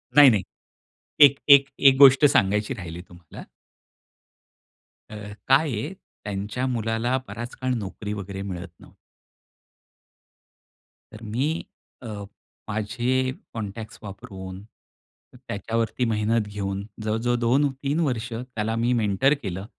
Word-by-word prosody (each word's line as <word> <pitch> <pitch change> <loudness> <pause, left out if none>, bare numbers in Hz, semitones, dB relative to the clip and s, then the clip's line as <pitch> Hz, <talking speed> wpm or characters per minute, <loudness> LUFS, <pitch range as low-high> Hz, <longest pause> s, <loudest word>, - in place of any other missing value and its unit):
नाही, 145 -2 +10
नाही. 105 -5 +2 0.8
एक 140 0 +3 0.2
एक 140 -1 +7 0.2
एक 135 - +1
गोष्ट 135 +1 +8
सांगायची 105 -5 +2
राहिली 85 -2 -7
तुम्हाला. 85 -2 -12 1.7
अ, 110 - -9 0.3
काय 140 +3 +4
आहे, 125 - -3 0.3
त्यांच्या 105 +5 -3
मुलाला 115 +1 0
बराच 120 +4 -7
काळ 130 0 -2
नोकरी 105 -2 -5
वगैरे 100 -1 -6
मिळत 90 -2 -6
नव्हती. - - -18 2.2
तर 110 +1 -11
मी 115 +6 -1 0.6
अ, - - -7 0.6
माझे 120 +5 0 0.2
कॉन्टॅक्ट्स 110 0 -6
वापरून, 95 -3 -9 0.9
त्याच्यावरती 115 +3 -2
मेहनत 110 0 0
घेऊन, 100 -1 -4 0.2
जवळजवळ 115 +3 0
2-3 135 +4 +1
वर्ष 125 -7 -1
त्याला 115 -2 -3
मी 120 +2 +1
मेंटर 105 +7 +3
केलं 95 -1 -4
115 Hz, 110 wpm, -24 LUFS, 100-130 Hz, 2.2 s, नाही